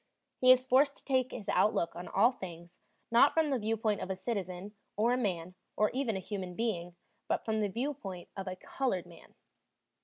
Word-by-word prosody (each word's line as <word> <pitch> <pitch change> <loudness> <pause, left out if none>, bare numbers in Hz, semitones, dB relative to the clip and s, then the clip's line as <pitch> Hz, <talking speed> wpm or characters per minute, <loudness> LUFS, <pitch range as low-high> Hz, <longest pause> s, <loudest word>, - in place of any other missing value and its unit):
He 255 0 +7
is 255 0 +5
forced 275 +2 +4
to - - -16
take 260 -2 +2
his 210 -5 -7
outlook 170 -6 +2
on 175 +1 -7
all 240 - +4
things, 175 -5 -10 0.3
not 240 +5 +6
from 320 -2 +3
the 265 - +1
viewpoint 220 -1 0
of - - -4
a 190 - -1
citizen, 190 -1 -4 0.2
or 230 +3 +3
a - - +3
man, 185 -7 -2 0.2
or 210 0 +3
even 255 -5 -1
a - - -3
human 185 -2 -5
being, 180 -6 -2 0.3
but - - -1
from 220 -1 0
the 205 - +1
viewpoint 210 -6 -4
of 195 -1 -5
a 185 - -3
colored 190 -2 -2
man. 170 -2 -16
210 Hz, 195 wpm, -32 LUFS, 185-250 Hz, 0.3 s, He